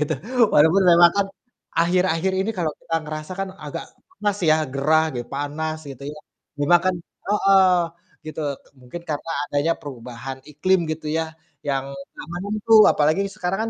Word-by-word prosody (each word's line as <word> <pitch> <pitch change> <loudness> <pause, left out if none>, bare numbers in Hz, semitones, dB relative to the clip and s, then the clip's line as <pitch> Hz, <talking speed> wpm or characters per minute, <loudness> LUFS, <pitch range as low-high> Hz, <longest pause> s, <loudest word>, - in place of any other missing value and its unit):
gitu, 150 - 0 0.4
walaupun 160 +6 +5
memang 170 0 +7
kan, 200 -1 +2 0.5
akhir-akhir 180 +1 +2
ini 200 +4 0
kalau 160 -3 0
kita 165 - -4
ngerasa 155 +2 -6
kan 195 - -2 0.2
agak - - -5 0.3
panas 205 -1 0
ya, 155 - +6 0.2
gerah 155 +3 +3
gi 120 - -2
panas 150 +3 -3
gitu, 135 0 -10
ya. 150 - -11 0.4
Dimakan 175 +5 +3 0.3
heeh, 195 -3 +5 0.5
gitu, 155 - -6 0.4
mungkin 125 +7 -8
karena 150 +2 -4 0.2
adanya 145 +4 +1
perubahan 130 -1 -8
iklim 185 +6 +2
gitu 155 0 -5
ya, 165 - 0 0.4
yang 135 -2 0
nggak 140 +1 -11
menentu, 210 +5 0 0.2
apalagi 155 +4 +2
sekarang 180 +2 -2
160 Hz, 145 wpm, -22 LUFS, 145-185 Hz, 0.5 s, memang